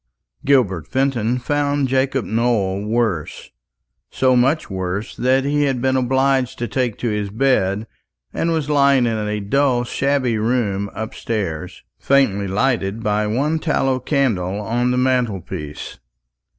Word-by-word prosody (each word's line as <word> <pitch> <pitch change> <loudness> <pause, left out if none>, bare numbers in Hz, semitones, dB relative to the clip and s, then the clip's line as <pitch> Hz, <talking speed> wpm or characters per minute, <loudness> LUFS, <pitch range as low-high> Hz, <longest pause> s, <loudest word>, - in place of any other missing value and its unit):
Gilbert 110 - +2
Fenton 125 -3 0
found 145 +1 0
Jacob 135 -1 0
Nowell 105 -4 0
worse; 110 -8 -2 0.6
so 130 -1 +2
much 135 +6 +2
worse, 95 +2 -4
that 130 +2 +1
he 145 +1 +1
had 135 -3 0
been 130 +1 +1
obliged 130 0 +1
to 120 - -3
take 125 -1 -1
to 120 - -2
his 105 -1 -2
bed, 110 -3 +1 0.5
and 165 - -1
was 160 -3 -1
lying 140 -3 +4
in 115 -2 0
a 105 0 -2
dull 125 +4 +1
shabby 130 -2 0
room 105 -4 0
upstairs, 95 -6 -4 0.2
faintly 105 -8 +2
lighted 105 0 0
by 105 0 0
one 145 +9 0
tallow 135 -5 0
candle 115 - 0
on 120 +4 0
the 125 - 0
mantelpiece. 115 - -2
120 Hz, 135 wpm, -20 LUFS, 105-135 Hz, 0.6 s, lying